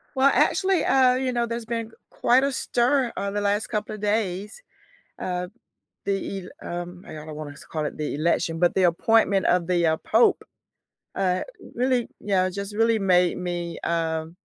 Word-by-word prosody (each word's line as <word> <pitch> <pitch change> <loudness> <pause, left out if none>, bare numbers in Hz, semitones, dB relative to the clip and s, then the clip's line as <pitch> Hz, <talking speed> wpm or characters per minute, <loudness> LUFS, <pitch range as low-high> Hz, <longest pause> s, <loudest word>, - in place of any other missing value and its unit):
Well, 270 +1 +5
actually, 375 -4 +2
uh, 255 -1 +4
you 255 -1 -1
know, 240 -1 +1
there's 235 0 -4
been 230 -1 -4 0.2
quite 255 +3 +3
a 280 - +1
stir, 250 +1 +1
uh, 200 0 -2
the 205 - -2
last 205 +1 0
couple 215 -1 -3
of 210 - -11
days. 205 - -1 0.6
Uh, 180 0 -3 0.6
the 195 -1 -3
el - - -6
um, 175 +1 -11
I - - -9
I 155 -1 -8
don't 155 - -8
wanna 150 -1 -7 0.2
call 155 -2 -2
it - - -6
the 150 -1 -3
election, 165 +1 0
but 175 0 +3
the 190 - +2
appointment 195 +3 +3
of 175 -1 +2
the, 175 -1 +2
uh, 160 0 +3
pope, 225 +2 +3 0.7
uh, 185 -2 0 0.3
really, 250 -1 +1
yeah, 185 -2 +1
just 200 +2 -6
really 225 +1 +3
made 180 -3 +3
me, 175 -1 -4
um, 165 0 -2
195 Hz, 180 wpm, -24 LUFS, 175-230 Hz, 0.7 s, Well